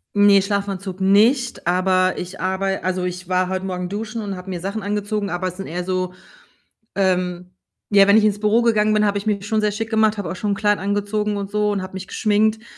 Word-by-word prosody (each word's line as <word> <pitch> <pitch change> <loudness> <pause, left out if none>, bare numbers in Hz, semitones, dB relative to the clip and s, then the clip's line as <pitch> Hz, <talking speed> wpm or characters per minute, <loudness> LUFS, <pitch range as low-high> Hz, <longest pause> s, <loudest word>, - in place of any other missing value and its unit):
Ne, 205 -1 +6
Schlafanzug 195 -1 -3
nicht, 230 +4 +3
aber 185 +1 +2
ich 180 +2 -7
arbei 195 +1 -1
also, 185 0 -1
ich 180 0 -5
war 185 0 +1
heute 190 0 -3
Morgen 180 -1 -4
duschen 220 +2 -4
und 200 -2 -4
habe 180 +1 -9
mir 180 -2 -4
Sachen 200 +5 -4
angezogen, 205 0 -2
aber 180 0 -2
es 180 0 -6
sind 195 - -6
eher 175 +2 -4
so, 185 0 -2 0.8
ähm 180 -2 -1 0.4
ja, 200 -1 +6
wenn 200 +2 +6
ich 215 - +3
ins 205 -1 +1
Büro 210 +2 +3
gegangen 215 -2 +2
bin, 210 0 +3
habe 205 0 0
ich 200 - -3
mich 205 -2 -1
schon 215 0 0
sehr 210 -1 +1
schick 225 +2 -4
gemacht, 220 -1 +2
habe 200 - -3
auch 185 - -5
schon 205 +2 -2
'n - - +2
Kleid 205 +1 +2
angezogen 205 +1 -1
und 200 -1 -5
so 210 0 +1
und 200 -1 -1
habe 185 0 -8
mich 190 0 -6
geschminkt 215 +2 +1
200 Hz, 230 wpm, -21 LUFS, 185-210 Hz, 0.8 s, Ne